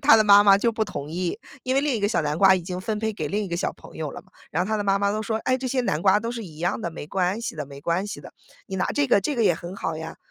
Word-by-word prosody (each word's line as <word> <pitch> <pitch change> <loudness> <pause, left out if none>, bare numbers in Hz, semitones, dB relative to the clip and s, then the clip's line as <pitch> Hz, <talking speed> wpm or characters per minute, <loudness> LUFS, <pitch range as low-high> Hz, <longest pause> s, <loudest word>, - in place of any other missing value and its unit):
他 275 -5 +8
的 215 - +4
妈 205 0 +8
妈 200 -1 +6
就 230 +3 +1
不 220 -1 0
同 145 -8 -6
意， 175 +4 -3 0.2
因 255 +1 0
为 - - +5
另 290 -2 0
一 225 - -1
个 205 - +2
小 210 -6 +1
南 150 0 -1
瓜 190 +2 +6
已 185 - -3
经 180 +1 -5
分 215 +2 -2
配 220 0 -1
给 155 -8 -4
另 210 +4 -1
一 - - -6
个 170 - -2
小 - - -1
朋 - - -15
友 - - -3
了 - - -8
嘛。 - - -30 0.2
然 - - -1
后 - - -6
他 220 - +1
的 210 - -1
妈 195 -1 +2
妈 200 0 +1
都 215 +1 -2
说： 220 +1 -1
“哎， 255 - +2
这 260 0 -4
些 260 +1 +1
南 155 -9 -1
瓜 190 +2 +5
都 230 +2 -4
是 235 -2 -5
一 155 -6 -11
样 175 +6 -1
的， 170 - -3
没 160 - -8
关 185 +5 0
系 235 - -4
的 155 -1 -4
没 140 0 -11
关 170 +5 0
系 205 - -6
的， - - -12 0.3
你 195 - -6
拿 190 - 0
这 290 -1 +1
个， 245 - +4
这 280 +8 -2
个 230 - +2
也 175 - +4
很 175 +3 -8
好 165 -4 -3
呀。 160 +1 -7
200 Hz, 380 characters per minute, -24 LUFS, 175-220 Hz, 0.3 s, 他